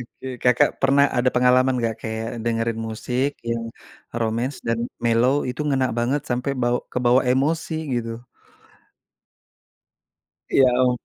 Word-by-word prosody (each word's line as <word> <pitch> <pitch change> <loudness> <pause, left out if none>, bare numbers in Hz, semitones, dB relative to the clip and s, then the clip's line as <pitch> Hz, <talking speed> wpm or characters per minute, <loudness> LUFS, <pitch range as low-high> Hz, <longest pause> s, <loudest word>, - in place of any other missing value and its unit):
oke. 120 +2 -10
Kakak 125 +4 +4
pernah 140 +1 +5
ada 120 +1 +3
pengalaman 125 +1 +4
nggak, 115 -2 -1
kayak 110 0 -4 0.2
dengerin 115 -1 -1
musik 125 +5 -1 0.2
yang 115 0 -2 0.5
romance 115 +4 -1
dan 115 0 0 0.3
mellow 120 +3 +3
itu 125 - -5
ngena 135 -3 +2
banget 130 +5 0
sampai 125 +3 -1
bawa 120 0 +1
kebawa 125 +1 +3
emosi, 155 +6 0 0.2
gitu? 115 0 -4 2.3
Ya 135 - +5
ampun. 125 0 +2
125 Hz, 125 wpm, -22 LUFS, 115-130 Hz, 2.3 s, pernah